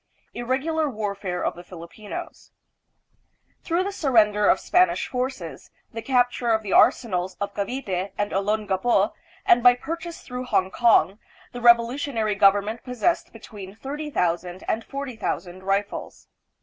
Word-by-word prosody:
Irregular 280 Hz, +6 st, -1 dB
Warfare 200 Hz, -5 st, -3 dB
of -, -, 0 dB
the 175 Hz, -, -11 dB
Filipinos. 180 Hz, +4 st, -9 dB, 1.1 s
Through 345 Hz, +2 st, 0 dB
the 400 Hz, -, -3 dB
surrender 215 Hz, -, +3 dB
of -, -, +4 dB
Spanish 360 Hz, -1 st, +2 dB
forces, 250 Hz, -, -5 dB, 0.2 s
the 225 Hz, -, -5 dB
capture 245 Hz, 0 st, +1 dB
of 220 Hz, -1 st, +2 dB
the 200 Hz, -, -3 dB
arsenals 185 Hz, -6 st, +3 dB
of 200 Hz, -, -3 dB
Cavite 200 Hz, -4 st, -3 dB
and 205 Hz, 0 st, -1 dB
Olongapo, 205 Hz, +1 st, +1 dB, 0.3 s
and 240 Hz, -, +5 dB
by 245 Hz, 0 st, +7 dB
purchase 335 Hz, +6 st, -6 dB
through 250 Hz, 0 st, -6 dB
Hong 190 Hz, -6 st, +1 dB
kong, 205 Hz, -5 st, +3 dB, 0.3 s
the 245 Hz, -, -7 dB
revolutionary 235 Hz, -1 st, +3 dB
government 205 Hz, +3 st, +2 dB
possessed 250 Hz, +7 st, -1 dB
between 205 Hz, -3 st, -11 dB
thirty 290 Hz, +6 st, -6 dB
thousand 180 Hz, -, -1 dB
and 225 Hz, -, -1 dB
forty 275 Hz, -1 st, -6 dB
thousand 180 Hz, -3 st, -4 dB
rifles. 195 Hz, +2 st, -3 dB
220 Hz, 135 wpm, -24 LUFS, 195-255 Hz, 1.1 s, by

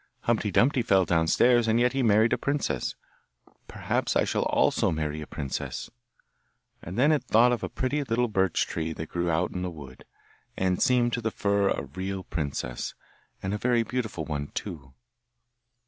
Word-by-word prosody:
Humpty 115 Hz, -3 st, 0 dB
dumpty 125 Hz, +7 st, +3 dB
fell 95 Hz, -5 st, +3 dB
downstairs, 115 Hz, +9 st, +3 dB
and 110 Hz, +1 st, +3 dB
yet 125 Hz, +1 st, +2 dB
he 135 Hz, -, 0 dB
married 110 Hz, -1 st, +4 dB
a -, -, +2 dB
princess; 140 Hz, -, -1 dB, 0.7 s
perhaps -, -, -2 dB
I -, -, +4 dB
shall -, -, 0 dB
also -, -, +2 dB
marry 75 Hz, -1 st, -2 dB
a 75 Hz, -, -7 dB
princess!' 70 Hz, -3 st, -5 dB, 0.9 s
And 90 Hz, +5 st, -7 dB
then 140 Hz, +5 st, +4 dB
it 150 Hz, -, +1 dB
thought 120 Hz, +3 st, +5 dB
of 120 Hz, -, -1 dB
a -, -, -3 dB
pretty 145 Hz, +3 st, -1 dB
little 120 Hz, -1 st, 0 dB
birch 95 Hz, -5 st, +1 dB
tree 80 Hz, 0 st, -3 dB
that 80 Hz, 0 st, -7 dB
grew 85 Hz, 0 st, -1 dB
out 85 Hz, +2 st, 0 dB
in 90 Hz, -, -4 dB
the 90 Hz, -, -2 dB
wood, 70 Hz, -6 st, -11 dB, 0.5 s
and 95 Hz, -1 st, 0 dB
seemed 120 Hz, -1 st, +3 dB
to 120 Hz, -, -1 dB
the 110 Hz, -, 0 dB
fir 100 Hz, -2 st, +1 dB
tree -, -, -1 dB
a -, -, -7 dB
real 95 Hz, +7 st, -5 dB
princess, 70 Hz, -7 st, -4 dB, 0.5 s
and 95 Hz, +1 st, -2 dB
a 105 Hz, -, -2 dB
very 120 Hz, 0 st, +2 dB
beautiful 110 Hz, -10 st, -3 dB
one 70 Hz, -2 st, -3 dB
too. 75 Hz, -9 st, -6 dB
95 Hz, 180 wpm, -27 LUFS, 80-120 Hz, 0.9 s, thought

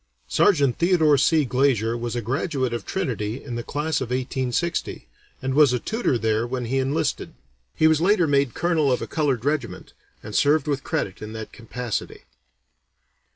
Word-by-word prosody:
Sergeant 140 Hz, -, +3 dB
Theodore 170 Hz, -4 st, +4 dB
C. 150 Hz, +2 st, +3 dB
Glazier 125 Hz, -3 st, +1 dB
was 120 Hz, 0 st, -4 dB
a 120 Hz, -, -2 dB
graduate 130 Hz, -, -1 dB
of 120 Hz, -, -5 dB
Trinity 125 Hz, -, -3 dB
in 135 Hz, -, -7 dB
the 120 Hz, -, -3 dB
class 150 Hz, +4 st, -2 dB
of 130 Hz, -, -3 dB
1860, 130 Hz, -, -2 dB, 0.4 s
and 130 Hz, 0 st, -1 dB
was 145 Hz, -2 st, +5 dB
a 125 Hz, -, 0 dB
tutor 220 Hz, -, -1 dB
there 110 Hz, 0 st, 0 dB
when 125 Hz, 0 st, -3 dB
he 135 Hz, +3 st, 0 dB
enlisted. 135 Hz, +4 st, -1 dB, 0.4 s
He -, -, +2 dB
was 160 Hz, -1 st, +4 dB
later 185 Hz, 0 st, +4 dB
made 140 Hz, -4 st, +1 dB
colonel 160 Hz, -5 st, +1 dB
of 125 Hz, -, 0 dB
a -, -, -3 dB
colored 140 Hz, -7 st, -1 dB
regiment, 150 Hz, 0 st, -2 dB, 0.3 s
and 110 Hz, -, -8 dB
served 145 Hz, +6 st, +3 dB
with 140 Hz, -3 st, -2 dB
credit 95 Hz, -, -3 dB
in 110 Hz, 0 st, -7 dB
that 110 Hz, -1 st, -7 dB
capacity. 120 Hz, -1 st, -5 dB
135 Hz, 170 wpm, -23 LUFS, 120-155 Hz, 0.4 s, was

